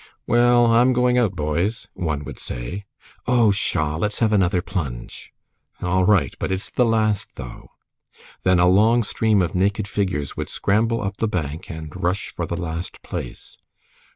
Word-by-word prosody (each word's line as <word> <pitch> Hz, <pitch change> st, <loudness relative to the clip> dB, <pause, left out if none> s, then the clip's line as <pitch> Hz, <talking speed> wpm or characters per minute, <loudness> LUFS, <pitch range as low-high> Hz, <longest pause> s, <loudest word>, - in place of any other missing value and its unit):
"Well, 120 Hz, 0 st, +4 dB
I'm 120 Hz, +2 st, +4 dB
going 125 Hz, 0 st, +3 dB
out, 105 Hz, -6 st, +1 dB
boys," 85 Hz, +8 st, -1 dB
one 75 Hz, -5 st, -2 dB
would -, -, -8 dB
say. 60 Hz, +12 st, -6 dB, 0.4 s
"Oh, 120 Hz, -4 st, +4 dB
pshaw! 80 Hz, -6 st, 0 dB
let's 105 Hz, +5 st, -1 dB
have 110 Hz, -2 st, +2 dB
another 95 Hz, -3 st, +3 dB
plunge." 70 Hz, -, -5 dB, 0.5 s
"All 90 Hz, +1 st, +1 dB
right. 90 Hz, -12 st, +3 dB
But -, -, -2 dB
it's 95 Hz, +1 st, -2 dB
the 125 Hz, -, +2 dB
last, 110 Hz, -3 st, 0 dB
though." 60 Hz, -2 st, -9 dB, 0.7 s
Then 95 Hz, -1 st, +3 dB
a 90 Hz, +1 st, +5 dB
long 110 Hz, +6 st, +4 dB
stream 105 Hz, -2 st, +2 dB
of 85 Hz, -, -2 dB
naked 100 Hz, +2 st, +1 dB
figures 95 Hz, -9 st, -2 dB
would -, -, -4 dB
scramble 115 Hz, +3 st, +1 dB
up 100 Hz, 0 st, -3 dB
the 115 Hz, -, 0 dB
bank 80 Hz, -5 st, -4 dB
and 80 Hz, -2 st, -7 dB
rush 90 Hz, +3 st, -1 dB
for -, -, -4 dB
the -, -, -3 dB
last 85 Hz, +1 st, -5 dB
place. -, -, -7 dB
95 Hz, 165 wpm, -22 LUFS, 85-110 Hz, 0.7 s, a